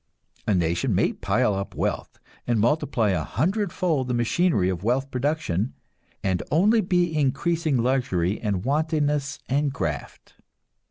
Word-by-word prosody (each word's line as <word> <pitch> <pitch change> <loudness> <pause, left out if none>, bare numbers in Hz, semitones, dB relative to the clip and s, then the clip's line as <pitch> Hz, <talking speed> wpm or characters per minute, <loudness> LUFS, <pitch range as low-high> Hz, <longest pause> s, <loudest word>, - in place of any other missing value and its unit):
A 105 - +3
nation 90 +7 +1
may 100 - +2
pile 105 +3 +1
up 100 0 -4
wealth, - - -2 0.3
and 120 -2 +2
multiply 120 -3 +1
a 85 -4 0
hundredfold 175 - 0
the 125 - -1
machinery 120 - +2
of 95 -1 -2
wealth 130 +5 0
production, 130 - -1 0.5
and 95 -2 0
only 210 +8 +4
be 175 -3 +1
increasing 155 +1 +1
luxury 115 -7 0
and 100 -2 -2
wantonness 145 -1 0
and 140 +2 +1
graft. 75 - -5
130 Hz, 130 wpm, -25 LUFS, 100-155 Hz, 0.5 s, only